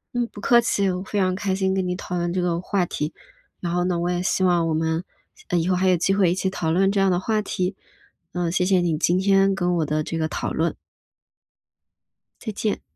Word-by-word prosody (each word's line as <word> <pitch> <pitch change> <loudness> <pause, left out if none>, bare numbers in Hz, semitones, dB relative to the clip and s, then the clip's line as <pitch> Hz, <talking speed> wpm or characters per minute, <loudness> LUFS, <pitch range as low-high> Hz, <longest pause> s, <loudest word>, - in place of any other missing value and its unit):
嗯， 240 -1 0
不 205 - -12
客 240 +3 +5
气， 200 -4 +1
我 180 0 -3
非 205 - -4
常 185 -2 +2
开 190 -1 -1
心 190 0 0
跟 190 -1 0
你 180 - -1
讨 180 -1 -5
论 175 0 -1
这 185 - 0
个 170 -1 0
话 185 0 0
题， 150 -1 -4 0.5
然 170 -1 -2
后 175 0 +1
呢 180 -2 0
我 175 +1 -1
也 175 0 -1
希 185 - 0
望 175 -2 +3
我 160 - 0
们， 160 +2 -1 0.4
呃， 175 - 0
以 170 +2 0
后 185 - +3
还 185 +1 +1
有 180 - +5
机 180 +3 +1
会 195 -3 +3
一 175 - +1
起 190 0 -1
讨 170 -4 -2
论 195 +4 +3
这 200 - 0
样 195 -1 +3
的 180 - +2
话 215 +4 0
题， 185 -1 -2 0.6
嗯， 175 -2 -1
谢 180 +1 +1
谢 185 -1 +3
你 165 -3 0
今 175 +2 +2
天 195 0 +3
跟 180 -1 0
我 160 - +1
的 155 +1 -1
这 165 - -4
个 160 -1 0
讨 - - -3
论。 165 +1 0 1.7
再 220 - -4
见。 210 0 -2
180 Hz, 265 characters per minute, -23 LUFS, 170-195 Hz, 1.7 s, 客